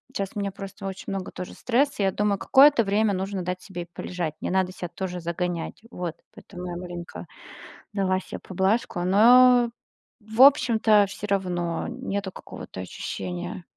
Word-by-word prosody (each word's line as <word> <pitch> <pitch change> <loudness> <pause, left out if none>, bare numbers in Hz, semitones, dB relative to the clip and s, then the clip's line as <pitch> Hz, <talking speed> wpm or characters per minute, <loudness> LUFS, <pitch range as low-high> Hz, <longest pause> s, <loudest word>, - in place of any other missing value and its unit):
щас 195 -1 -2
у - - -2
меня 200 -1 -2
просто 195 +1 -9
очень 190 -1 -6
много 195 -1 -4
тоже 180 - -7
стресса, 255 -1 +1
я 195 - +3
думаю, 205 0 0
какое-то 275 0 +6
время 205 +1 +2
нужно 190 0 -3
дать 180 +1 -4
себе 180 -3 -6
и - - -13
полежать, 170 -4 -4
не - - -2
надо 185 0 +1
ся 175 -2 -6
тоже 180 0 -5
загонять. 170 +2 -3
Вот, 175 -5 -4 0.2
поэтому 180 -2 -10
я 175 - -5
маленько, 175 -1 -7 0.7
дала 190 -2 +1
се - - -8
поблажку, 190 +1 0
но 240 +5 +6 0.5
в 220 +3 -1
общем-то 230 -6 +6
всё 210 - -6
равно, 175 -4 -1
нету 200 -1 -4
какого-то - - -9
ощущения. 180 0 -5
190 Hz, 160 wpm, -25 LUFS, 180-210 Hz, 0.7 s, какое-то